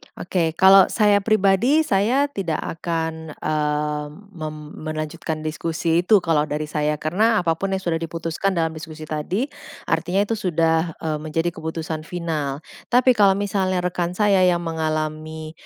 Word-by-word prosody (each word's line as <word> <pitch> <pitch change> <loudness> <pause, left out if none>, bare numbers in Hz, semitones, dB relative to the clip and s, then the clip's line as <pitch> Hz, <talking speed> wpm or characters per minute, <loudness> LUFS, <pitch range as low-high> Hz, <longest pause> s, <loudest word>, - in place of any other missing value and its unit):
Oke, 170 -3 -1
kalau 190 +1 +7
saya 205 -2 +3
pribadi, 215 +8 +3
saya 250 +5 +2
tidak 180 - -2
akan, 160 -1 -4
eee, 150 -1 -1 0.3
mem 155 -4 -6 0.2
melanjutkan 155 0 -4
diskusi 165 +1 -1
itu 205 -3 +5
kalau 155 -3 +2
dari 150 +1 -2
saya. 150 0 0
Karena 195 +8 +1
apapun 170 +4 0
yang 190 - -3
sudah 165 -2 0
diputuskan 165 +3 -2
dalam 165 -1 +1
diskusi 155 0 -9
tadi, 165 - -2 0.4
artinya 185 +4 +1
itu 225 +2 -2
sudah, 165 -3 +1
eee, 155 -2 -1
menjadi 155 +2 -1
keputusan 160 -1 -5
final. 155 -5 -3 0.3
Tapi 250 +1 +4
kalau 200 -2 +5
misalnya 190 -2 -1
rekan 180 0 -2
saya 200 -2 +4
yang 175 -1 +1
mengalami, 155 -1 -3
165 Hz, 140 wpm, -22 LUFS, 155-195 Hz, 0.4 s, kalau